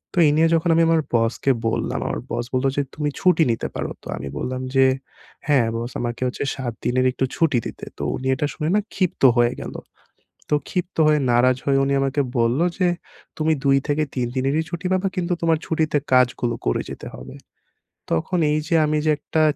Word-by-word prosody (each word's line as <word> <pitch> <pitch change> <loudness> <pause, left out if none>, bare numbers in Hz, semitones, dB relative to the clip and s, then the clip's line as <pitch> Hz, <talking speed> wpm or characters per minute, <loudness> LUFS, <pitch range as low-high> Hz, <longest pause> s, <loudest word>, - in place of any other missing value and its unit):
তো - - +2
এই 145 - +4
নিয়ে 165 - +5
যখন 165 +1 +1
আমি 165 - +4
আমার 165 -1 +3
বসকে 115 +4 +1 0.2
বললাম, 115 - -1
আমার - - -3
বস 120 - -2
বললো 130 +1 +2
যে 145 - +3
"তুমি 150 -1 -1
ছুটি 180 -3 +4
নিতে 115 - -2
পারো।" - - -3
তো - - -10
আমি 70 - -6
বললাম 130 0 -3
যে 135 0 +6 0.6
"হ্যাঁ 135 -6 +4
বস 120 +2 -4
আমাকে 120 +1 -4
হচ্ছে 125 - -3
৭ 125 -3 -4
দিনের 130 +1 +2
একটু 130 - -1
ছুটি 165 -6 +2
দিতে।" - - -7
তো - - -5
উনি 130 - -4
এটা 140 - -1
শুনে 155 - -2
না - - +4 0.2
ক্ষিপ্ত 185 -6 -1
হয়ে 120 +1 +3
গেল। - - -6 0.8
তো - - +3 0.2
ক্ষিপ্ত 180 0 -3
হয়ে 150 -1 +4
নারাজ 125 +1 +4
হয়ে 135 -1 +3
উনি 140 - 0
আমাকে 135 +1 0 0.2
বললো 120 +7 +2
যে 185 - +3 0.5
"তুমি 160 0 +2
২-৩ 140 -1 +1
দিনেরই 135 +5 +1
ছুটি 175 +1 -4
পাবা 185 +1 +1
কিন্তু 180 -1 -1
তোমার 165 -1 +3
ছুটিতে 155 -2 +1
কাজগুলো 125 -1 +3
করে - - +1
যেতে - - -8
হবে।" 65 +1 -10 0.8
তখন 130 - 0
এই 150 - +2
যে 170 - +1
আমি 150 0 +1
যে 155 - +4
একটা 155 +2 -1
140 Hz, 195 wpm, -22 LUFS, 125-160 Hz, 0.8 s, যে